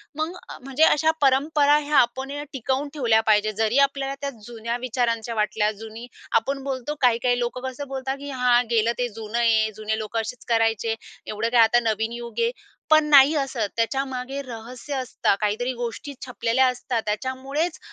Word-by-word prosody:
मग 315 +4 -3 0.3
म्हणजे 270 +4 0
अशा 320 0 +4
परंपरा 285 +2 +4
ह्या 300 0 0
आपण 260 +3 +2
या 290 +1 -4
टिकवून 270 +2 -2
ठेवल्या 235 -7 +3
पाहिजे. 215 0 +3
जरी 225 +5 +2
आपल्याला 275 0 -4
त्या 280 - -2 0.2
जुन्या 235 0 -4
विचारांच्या 230 -2 -1
वाटल्या. 210 0 +1
जुनी 220 +2 -10 0.3
आपण 275 +3 -4
बोलतो 270 +1 -3
काही-काही 245 0 +3
लोकं 245 +1 -3
कसं 260 +2 -5
बोलतात 265 0 -3
की, 285 +1 -7
"हां. 250 -2 +3
गेलं 230 -1 +2
ते 245 - 0
जुनं 220 +1 -6
आहे. 220 -2 +3
जुने 215 0 -2
लोक 215 +1 -4
असेच 225 +2 -4
करायचे. 225 -1 +1 0.3
एवढं 215 +2 -2
काय 240 -1 +5
आता 235 +2 +5
नवीन 220 0 -1
युग 235 - -7
आहे." 465 0 +2 0.4
पण 310 -1 +6
नाही 285 +1 +7
असत 235 -6 -3
त्याच्यामागे 265 +2 -2
रहस्य 245 +4 -7
असतं 255 -6 0
काहीतरी, 220 +5 0
गोष्टी 240 +4 -5
छिपलेल्या 250 0 +1
असतात. 250 -1 -2
त्याच्यामुळेच 265 +9 -2
245 Hz, 165 wpm, -24 LUFS, 225-275 Hz, 0.4 s, नाही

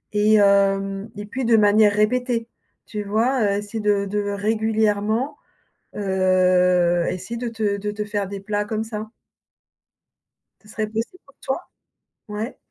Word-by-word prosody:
et 210 +1 +4
hem 195 0 +2
et 205 - -5
puis 260 +6 -4
de 230 -1 +5
manière 210 0 +5
répétée. 230 +2 +1 0.4
Tu 210 - -5
vois, 230 +6 +1
heu, 200 -1 +1
essayer 205 +2 -5
de 205 -1 +1
de 205 +1 -1
régulièrement, 220 +3 0 0.6
heu, 180 -3 +3
essayer 185 +6 -5
de 240 +1 -3
te 215 -3 -1
de 210 +1 -3
te 210 0 -4
faire 205 -1 -2
des 200 +1 -6
plats 205 +1 -2
comme 220 +1 -2
ça. 215 -1 -6 1.5
Ça 210 - -20
serait 215 0 -3
possible 225 +11 -4
pour 280 - -21
toi? 265 +7 -3 0.7
Ouais? 210 +3 -5
210 Hz, 145 wpm, -22 LUFS, 200-220 Hz, 1.5 s, de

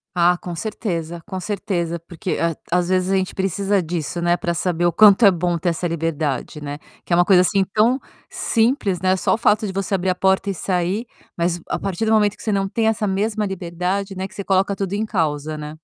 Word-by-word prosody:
Ah, 175 0 +4
com 175 -2 -6
certeza, 170 -4 -4
com 190 -2 -4
certeza 175 -4 -2
porque 170 +2 -5
a 165 -2 0 0.2
às 180 0 +1
vezes 185 0 +1
a - - +3
gente 190 -1 -1
precisa 195 +1 0
disso, 170 0 -3
né, 175 0 +3
para 170 -1 -2
saber 175 0 0
o 175 - +4
quanto 210 +3 +6
é 200 - +9
bom 175 0 0
ter 170 +2 0
essa 170 +1 -1
liberdade, 155 -3 -2
né. 145 0 -6 0.3
Que - - -2
é - - +6
uma 175 - +5
coisa 180 -1 +5
assim 195 +1 +2
tão 235 +5 +3 0.3
simples, 225 -6 +1
né, 185 0 +3
só - - +1
o - - -4
fato 215 -2 +2
de 190 - -5
você 195 +1 -2
abrir 190 0 +1
a 180 - +1
porta 190 +2 +1
e - - 0
sair, 185 +5 -1 0.3
mas 170 0 0
a - - 0
partir 195 +3 -2
do 220 - +1
momento 210 -2 +3
que - - -14
você 215 - -1
não 195 -1 +1
tem 220 +2 0
essa 220 -1 +1
mesma 210 +2 0
liberdade, 190 +1 -3
né, 190 +1 -3
que 210 - -19
você 200 - -5
coloca 195 +1 +1
tudo 195 0 -3
em 215 +2 0
causa, 155 -6 -1
né. 150 +1 -7
185 Hz, 235 wpm, -21 LUFS, 170-200 Hz, 0.3 s, é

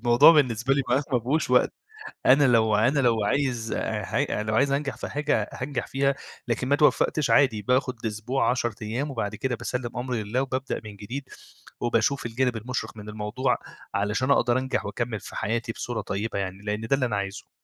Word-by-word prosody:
الموضوع 120 +6 +8
بالنسبة 130 -3 +2
لي 140 - +1
مبقاش 130 +4 +3
ما 125 - +4
فيهوش 135 +4 0
وقت، 125 - +4 0.5
أنا 135 +3 +6
لو 110 -3 +4
أنا 130 +7 +3
لو 115 -5 +2
عايز 120 -1 0
ح - - -3
لو 110 +1 -1
عايز 140 +2 +3
أنجح 140 0 -1
في - - -5
حاجة 145 -8 0
هانجح 125 -1 -4
فيها، 135 0 +1 0.3
لكن 120 +2 -1
ما 140 - +2
اتوفّقتش 150 0 +2
عادي 120 -7 +4
باخد 125 +1 0
أسبوع، 110 +5 0
10 120 -3 -1
أيام، 125 +7 -2
وبعد 110 -4 -3
كده 125 +2 -2
باسلّم 120 0 -4
أمري 120 -3 -2
لله 120 +6 -1
وبابدأ 135 0 -3
من 105 -1 -9
جديد، 130 +7 -7 0.5
وباشوف 120 +3 +1
الجانب 120 +1 0
المُشرق 120 0 -4
من 105 0 -8
الموضوع، 105 +5 -1 0.4
علشان 105 +7 0
أقدر 120 -2 +3
أنجح 130 -4 -1
وأكمّل 110 +1 -3
في - - -10
حياتي 115 +3 -1
بصورة 115 -1 -4
طيبة 100 +1 -3
يعني، 95 -1 -3
لإن 105 +1 -2
ده 135 - +4
اللي 130 -2 0
أنا 110 - -1
عايزه. 100 0 -4
120 Hz, 185 wpm, -26 LUFS, 110-135 Hz, 0.5 s, الموضوع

